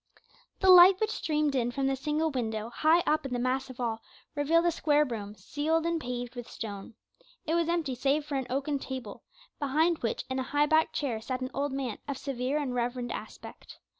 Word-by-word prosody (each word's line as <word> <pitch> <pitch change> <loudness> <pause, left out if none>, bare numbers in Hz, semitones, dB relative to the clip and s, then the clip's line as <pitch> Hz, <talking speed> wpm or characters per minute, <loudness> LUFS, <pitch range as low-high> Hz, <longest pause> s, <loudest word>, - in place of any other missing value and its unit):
The 380 -1 +7
light 365 +1 +9
which 435 0 0
streamed 305 -6 0
in 245 -3 +1
from 270 +2 -2
the 270 0 +1
single 305 +3 -1
window 225 -3 -3
high 320 +6 +4
up 305 +1 +2
in 270 -2 -5
the - - 0
massive 255 +1 -2
wall 225 -2 -2 0.3
revealed 320 +4 +2
a 345 - +4
square 300 -2 +2
room, 210 -5 -6
ceiled 305 - -1
and 335 -1 0
paved 245 -1 -4
with 245 -2 -8
stone. 205 -1 -7 0.5
It 320 - -1
was 335 -1 +1
empty 330 -6 0
save 280 +4 0
for 295 - -6
an 265 -2 -1
oaken 280 +2 -1
table, 255 -7 -7 0.4
behind 315 +4 +2
which 230 - -2
in 260 0 -2
a 260 - -4
high 295 - +5
backed 315 +1 +2
chair 240 -7 -2
sat 255 +2 -4
an 255 - -4
old 285 +1 -1
man 265 -4 -3
of 280 -2 -3
severe 265 +1 -2
and 275 -4 -2
reverend 245 0 -2
aspect. - - -9
275 Hz, 205 wpm, -29 LUFS, 245-310 Hz, 0.5 s, light